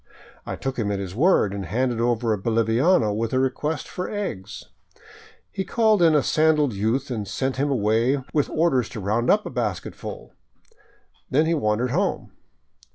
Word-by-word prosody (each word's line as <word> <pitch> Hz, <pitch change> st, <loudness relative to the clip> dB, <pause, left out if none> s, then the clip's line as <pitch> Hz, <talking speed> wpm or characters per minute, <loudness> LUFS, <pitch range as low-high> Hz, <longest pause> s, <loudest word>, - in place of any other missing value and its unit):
I -, -, -3 dB
took 135 Hz, -1 st, -4 dB
him 105 Hz, -2 st, 0 dB
at 100 Hz, -, -1 dB
his 95 Hz, -2 st, -5 dB
word 125 Hz, -, +3 dB
and 100 Hz, -1 st, -4 dB
handed 115 Hz, +5 st, -1 dB
over 120 Hz, -1 st, +1 dB
a -, -, -1 dB
boliviano 115 Hz, -, +2 dB
with 115 Hz, +2 st, -2 dB
a 130 Hz, -, +2 dB
request 145 Hz, +4 st, -1 dB
for 180 Hz, -, -5 dB
eggs. 110 Hz, -, -5 dB, 0.9 s
He 190 Hz, -, -3 dB
called 215 Hz, 0 st, +2 dB
in 165 Hz, -2 st, +5 dB
a 145 Hz, -, +3 dB
sandaled 155 Hz, -4 st, +2 dB
youth 115 Hz, +7 st, -1 dB
and 105 Hz, -4 st, -3 dB
sent 130 Hz, +4 st, -2 dB
him 145 Hz, +2 st, 0 dB
away 120 Hz, +2 st, +1 dB
with 150 Hz, -2 st, +1 dB
orders 155 Hz, -8 st, +1 dB
to 120 Hz, -3 st, -7 dB
round 110 Hz, +5 st, 0 dB
up 210 Hz, +1 st, +3 dB
a -, -, -5 dB
basketful. 105 Hz, -9 st, -5 dB, 1.0 s
Then 150 Hz, +4 st, +3 dB
he 165 Hz, -, +1 dB
wandered 120 Hz, -3 st, 0 dB
home. -, -, -1 dB
125 Hz, 170 wpm, -23 LUFS, 110-150 Hz, 1.0 s, in